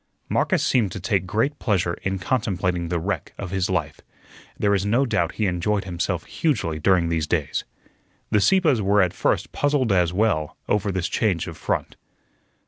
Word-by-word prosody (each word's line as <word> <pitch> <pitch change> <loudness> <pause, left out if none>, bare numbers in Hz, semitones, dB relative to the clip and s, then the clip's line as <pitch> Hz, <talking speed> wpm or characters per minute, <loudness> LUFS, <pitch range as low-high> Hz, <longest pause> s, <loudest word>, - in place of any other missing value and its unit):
Marcus - - +1
seemed 115 -8 +2
to - - -5
take 95 0 0
great 135 +9 0
pleasure 90 -6 +1
in 95 0 -1
contemplating 90 -4 -1
the 85 - 0
wreck 100 +5 -3
of 95 -3 -6
his 95 -1 0
life. 90 -6 -2 0.6
There 100 -1 +2
is 100 -1 +1
no 115 +7 +2
doubt 90 -9 0
he 110 - -1
enjoyed 95 +3 0
himself 90 -1 -2
hugely 100 - -1
during 90 0 +3
these 80 -2 0
days. 75 -5 -1 0.7
The 105 - +3
Sieppes 160 - +3
were 100 0 +4
at 90 - -1
first - - 0
puzzled 145 -5 +1
as 90 -3 +3
well 90 -6 0
over 105 -1 +1
this 95 -1 -1
change 95 -7 0
of - - -7
front. - - -3
95 Hz, 175 wpm, -23 LUFS, 85-105 Hz, 0.7 s, were